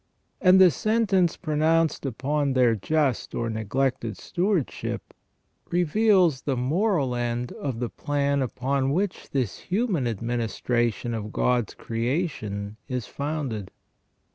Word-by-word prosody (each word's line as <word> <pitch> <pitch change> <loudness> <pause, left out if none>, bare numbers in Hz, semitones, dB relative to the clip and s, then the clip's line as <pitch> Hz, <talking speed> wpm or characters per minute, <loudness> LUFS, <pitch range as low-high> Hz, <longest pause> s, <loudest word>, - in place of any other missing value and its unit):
And 185 0 +7
the 185 -2 +8
sentence 195 - +2
pronounced 155 -2 +1
upon 140 +3 0
their 125 -3 +4
just 135 +4 0
or 115 -1 -1
neglected 115 0 -1
stewardship 180 - -2 0.6
reveals 180 - +3
the 135 -3 -1
moral 150 - +1
end 120 0 -2
of 130 -5 -4
the 120 -1 -2
plan 140 -1 0
upon 135 +2 0
which 190 +3 -2
this 130 -8 -2
human 190 - 0
admini 115 +1 -1
stration 120 -1 -1
of 105 -1 -5
God's 120 -4 +1
creation 115 - -3
is 125 -4 -3
founded. 140 -9 -4
135 Hz, 115 wpm, -25 LUFS, 120-165 Hz, 0.6 s, the